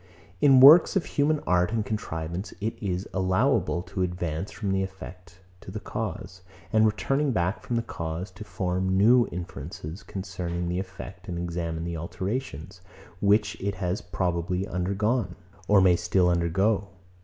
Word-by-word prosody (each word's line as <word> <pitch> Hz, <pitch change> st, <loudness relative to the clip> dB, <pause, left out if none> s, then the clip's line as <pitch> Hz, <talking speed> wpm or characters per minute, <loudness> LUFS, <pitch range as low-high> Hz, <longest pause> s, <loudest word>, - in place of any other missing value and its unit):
In 135 Hz, -2 st, +7 dB
works 155 Hz, +9 st, +9 dB
of 190 Hz, -, +1 dB
human 150 Hz, +1 st, +1 dB
art 90 Hz, +1 st, +2 dB
and 110 Hz, -2 st, -1 dB
contrivance, 85 Hz, -3 st, -4 dB
it 110 Hz, +2 st, -2 dB
is 95 Hz, -2 st, -2 dB
allowable 95 Hz, 0 st, +1 dB
to 95 Hz, -, -5 dB
advance 90 Hz, 0 st, -2 dB
from 100 Hz, -3 st, -3 dB
the 95 Hz, 0 st, +1 dB
effect 90 Hz, -2 st, -8 dB, 0.2 s
to -, -, -11 dB
the 105 Hz, +3 st, -5 dB
cause, 95 Hz, -3 st, -5 dB, 0.3 s
and 110 Hz, 0 st, +5 dB
returning 135 Hz, +8 st, 0 dB
back 90 Hz, -2 st, 0 dB
from 120 Hz, -, -3 dB
the 115 Hz, -, 0 dB
cause, 85 Hz, -2 st, -5 dB
to 110 Hz, -, -10 dB
form 95 Hz, -1 st, -1 dB
new 120 Hz, +4 st, +5 dB
inferences 85 Hz, 0 st, -7 dB
concerning 90 Hz, -3 st, -4 dB
the 90 Hz, +1 st, -1 dB
effect, 95 Hz, 0 st, -8 dB
and 85 Hz, -, -4 dB
examine 85 Hz, -1 st, -3 dB
the 85 Hz, 0 st, -4 dB
alterations, 95 Hz, -, -5 dB, 0.4 s
which 105 Hz, +1 st, +2 dB
it 100 Hz, +1 st, -2 dB
has 90 Hz, +1 st, -2 dB
probably 90 Hz, +1 st, -2 dB
undergone, 100 Hz, +2 st, -1 dB, 0.3 s
or 105 Hz, -1 st, +6 dB
may 90 Hz, -2 st, +5 dB
still 90 Hz, +1 st, +2 dB
undergo. 95 Hz, +4 st, +1 dB
95 Hz, 155 wpm, -26 LUFS, 90-105 Hz, 0.4 s, works